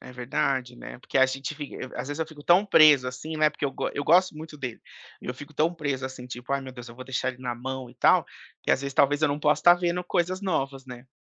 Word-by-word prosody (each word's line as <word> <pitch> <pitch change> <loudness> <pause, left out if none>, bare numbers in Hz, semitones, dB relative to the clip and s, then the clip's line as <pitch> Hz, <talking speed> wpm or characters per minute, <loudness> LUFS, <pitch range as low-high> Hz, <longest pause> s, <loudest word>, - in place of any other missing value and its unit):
É 125 - -11
verdade, 125 0 -2
né. - - -9
Porque 135 - -2
a 130 - +6
gente 135 +3 -4
f 145 -1 -8 0.2
à - - -2
às - - -6
vezes, 145 +2 -4
eu 160 - -1
fico 155 -2 -13
tão 175 +5 +5
preso, 150 -9 +6
assim, 155 +5 -6
né, 155 0 +4
porque 150 - -6
eu 135 - -1
go - - -3
eu 145 - -3
gosto 175 0 +4
muito 155 -1 -9
dele. 125 -5 -6 0.4
E - - -12
eu 125 - -3
fico 145 +3 -11
tão 165 +4 +1
preso 140 -4 -2
assim 130 -1 -9
tipo: 125 +1 -6
"Ai, 140 - +1
meu 130 -1 -9
Deus 120 -1 -10
eu 115 - -12
vou 130 +1 -9
deixar 130 0 -2
ele 130 0 -14
na 125 -1 -2
mão, 130 +1 -6
e - - -19
tal", - - +4 0.4
que - - -1
às - - +3
vezes 140 0 -5
talvez 145 +2 +3
eu 155 - +4
não 145 +1 -2
possa 150 0 +2
estar 175 0 +7
vendo 175 0 -1
coisas 180 +1 -1
novas, 135 -8 -2
né? 125 0 -10
140 Hz, 285 wpm, -26 LUFS, 130-155 Hz, 0.4 s, estar